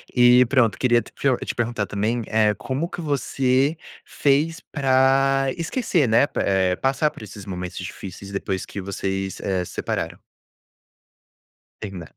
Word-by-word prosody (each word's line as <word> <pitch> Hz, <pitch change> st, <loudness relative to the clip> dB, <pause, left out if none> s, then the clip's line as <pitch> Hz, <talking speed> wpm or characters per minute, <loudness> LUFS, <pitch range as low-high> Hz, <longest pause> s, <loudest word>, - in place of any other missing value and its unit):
E, 125 Hz, +1 st, +7 dB
pronto, 120 Hz, -4 st, +2 dB
queria 120 Hz, -2 st, +3 dB
te -, -, -14 dB
prio 135 Hz, -3 st, +1 dB
te -, -, -4 dB
perguntar 120 Hz, -3 st, -1 dB
também, 110 Hz, +4 st, -1 dB
eh, 110 Hz, -1 st, +3 dB
como 135 Hz, +8 st, -3 dB
que 175 Hz, -, -7 dB
você 135 Hz, 0 st, +1 dB, 0.3 s
fez 155 Hz, +5 st, +1 dB
pra 135 Hz, -1 st, +3 dB
esquecer, 170 Hz, -, 0 dB
né? 110 Hz, +5 st, +4 dB
Pe -, -, -5 dB
eh, 95 Hz, -2 st, +1 dB
passar 135 Hz, +3 st, +1 dB
por -, -, -13 dB
esses 105 Hz, -1 st, -10 dB
momentos 90 Hz, -2 st, -6 dB
difíceis 100 Hz, +1 st, -8 dB
depois 95 Hz, -1 st, -3 dB
que 100 Hz, -, -7 dB
vocês, 95 Hz, 0 st, -3 dB
eh, 95 Hz, -2 st, -1 dB
separaram? -, -, -3 dB, 1.6 s
Terminar 95 Hz, -6 st, -7 dB
120 Hz, 145 wpm, -23 LUFS, 100-135 Hz, 1.6 s, E